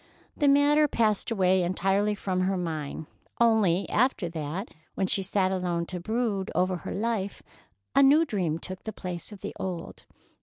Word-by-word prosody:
The 290 - +2
matter 290 +2 +5
passed 220 -6 +1
entirely 190 +1 +2
from 190 -2 -2
her 190 +1 +1
mind, 160 -3 -4 0.3
only, 215 -6 +3
after 230 -7 +1
that, 165 +5 -4 0.3
when 190 - 0
she 195 - +1
sat 190 0 +1
alone 175 -2 -1
to 180 +1 -6
brood 215 0 -1
over 185 0 +1
her - - -7
life, 210 -2 -2 0.5
a 275 - +6
new 290 +4 +6
dream 180 - -1
took 185 +2 -8
the 220 - -5
place 180 +1 -6
of 205 - -11
the - - -5
old. 180 -3 -5
190 Hz, 160 wpm, -27 LUFS, 180-220 Hz, 0.5 s, a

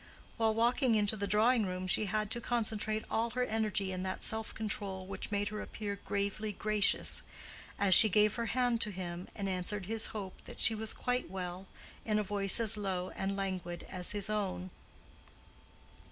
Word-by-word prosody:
While 220 -1 +2
walking 235 +1 +3
into 210 0 +3
the 200 -1 -2
drawing 220 +4 +4
room, 185 0 -3
she 185 +3 +2
had 215 +1 -1
to 235 - 0
concentrate 220 -2 -1
all 230 +1 +1
her 250 +2 -1
energy 215 -4 0
in 185 0 -3
that 185 0 -3
self 220 0 -2
control, 200 -3 -4
which 195 - -6
made 205 -1 0
her 210 0 -4
appear 205 -2 -5
gravely 200 +2 -1
gracious—as 205 -1 0
she 220 - +9
gave 210 +1 +4
her 235 -1 -2
hand 245 0 +1
to 210 - 0
him, 180 -2 -5
and 200 -2 -3
answered 185 +1 -2
his 220 +2 -2
hope 195 -4 -5
that - - -10
she 225 - +5
was 220 0 -2
quite 250 -4 -1
well 185 0 -5 0.4
in 215 -1 +1
a 210 - +2
voice 200 0 +1
as 225 -1 +3
low 185 -3 -2
and 195 +1 -2
languid 185 -3 -3
as 180 -2 -1
his 205 -2 -2
own. 195 -3 -2
210 Hz, 180 wpm, -33 LUFS, 190-220 Hz, 0.4 s, she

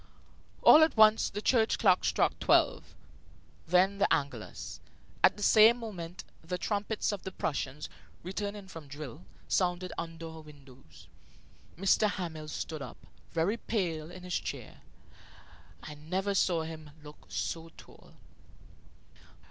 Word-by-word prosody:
All 310 - +9
at 315 -6 +1
once 215 0 +6
the 205 +2 -6
church 230 -3 +3
clock 190 -5 +4
struck - - +1
twelve. - - +2 0.7
Then 185 +4 +3
the 200 - +2
Angelus. 140 -7 -2 0.4
At - - +5
the 205 - -5
same 220 +3 +7
moment 185 -7 -7 0.2
the 180 +2 -3
trumpets 210 +3 -1
of 205 - -4
the 190 - -6
Prussians, 145 -4 -3 0.4
returning 200 +2 -5
from 165 -5 -10
drill, 140 -9 -9 0.2
sounded 180 0 0
under 165 0 -6
our 160 0 -9
windows. 140 -4 -16 0.7
M. 195 - -7 0.2
Hamel 165 -6 -5
stood 155 0 -5
up, - - -8 0.3
very 175 +7 0
pale, 170 -9 -2
in 180 +1 -11
his 180 -1 -1
chair. - - -7 1.0
I 150 - -7
never 185 +7 -2
saw 175 -4 +2
him 160 -1 -8
look 150 0 -14
so 165 0 -3
tall. - - -16
175 Hz, 130 wpm, -30 LUFS, 155-200 Hz, 1.0 s, All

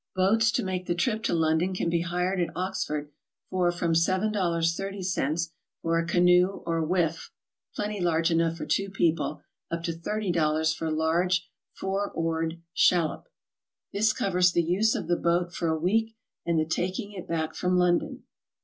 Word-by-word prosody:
Boats 220 +4 +3
to - - 0
make 185 -1 -3
the 175 - 0
trip 220 +3 0
to - - -1
London 160 +3 +1
can 180 - -1
be 170 0 +1
hired 180 +2 -1
at 170 -2 0
Ox 190 +1 -1
ford 150 -1 -4 0.4
for 180 -2 +2
from 175 -1 -1
$7..30 180 -2 0 0.3
for 165 0 +1
a 165 - -2
canoe 180 +2 +3
or 165 -1 0
whiff 165 -1 0 0.5
(plenty 210 -1 -3
large 165 -1 +2
enough 165 0 +1
for - - -5
two 195 0 0
people) 170 -4 0 0.3
up 170 0 -3
to 170 - -1
$30 165 -4 0
for 165 - -5
a - - -1
large 170 +3 +1 0.3
four 195 +1 -2
oared 165 0 -1
shallop. 175 - +2 0.6
This 215 +2 +3
covers 180 -4 +2
the 170 - +3
use 195 +7 +2
of - - -3
the 175 - +2
boat 175 +1 0
for 170 - -2
a 160 0 +1
week 220 +7 0 0.3
and 170 -1 +2
the 155 - +1
taking 185 +6 -2
it 185 -3 -8
back 160 -1 -2
from 180 0 0
London. 180 +10 +1
175 Hz, 170 wpm, -27 LUFS, 165-190 Hz, 0.6 s, Boats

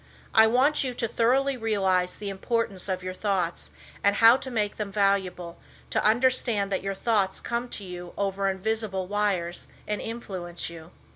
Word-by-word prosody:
I 220 0 +7
want 270 +6 +3
you 255 -2 -3
to 230 - -1
thoroughly 265 +5 +2
realize 190 -5 +1
the 205 - -5
importance 200 -1 -2
of 185 -1 -2
your 185 0 -4
thoughts, 185 -4 -1 0.3
and 200 0 +4
how 230 +3 +8
to 265 - -5
make 210 -4 -1
them 210 -2 -3
valuable, 190 -4 0 0.3
to - - +1
understand 225 -3 +2
that 190 - 0
your 195 0 -3
thoughts 200 -3 +1
come 235 +1 -3
to 210 - -7
you 180 -1 -8
over 195 0 0
invisible 195 0 -2
wires 190 -4 -1 0.2
and 210 0 -2
influence 185 -8 -5
you. 165 -1 -11
200 Hz, 165 wpm, -27 LUFS, 185-230 Hz, 0.3 s, how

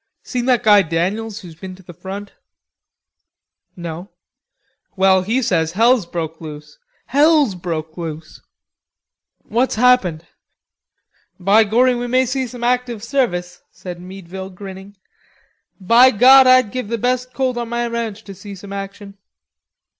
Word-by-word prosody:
"Seen 245 -2 -3
that 250 -3 +2
guy 210 -2 +6
Daniels 195 +6 -2
who's 175 -4 -11
been 185 +3 -10
to 190 - -18
the 175 - -12
front?" 195 +4 -8 1.4
"No." 170 +2 -7 0.9
"Well, 190 -1 +4
he 230 +8 -1
says 165 -5 0
hell's 230 -1 +3
broke 165 -2 -5
loose. 150 -1 -10 0.3
Hell's 290 -3 +3
broke 165 -3 -5
loose!" 160 -2 -8 1.0
"What's 240 +4 0
happened?... 215 -9 +2 1.1
Be 200 +4 +4
gorry, 245 +5 +3
we 245 0 -3
may 255 +2 +2
see 260 +1 -2
some 245 0 -9
active 245 -3 -1
service," 200 -9 -2
said 175 -2 -9
Meadville, 190 0 -9
grinning. 195 +1 -11 0.8
"By 230 +7 +6
God, 260 +3 +7
I'd 255 -4 +5
give 255 -4 -4
the 230 +2 -2
best 250 +2 -1
colt 260 -1 0
on 240 -1 -4
my 240 0 -1
ranch 230 -2 -4
to 200 - -10
see 200 +1 -10
some 195 +1 -10
action." 200 0 -8
205 Hz, 140 wpm, -19 LUFS, 180-245 Hz, 1.4 s, God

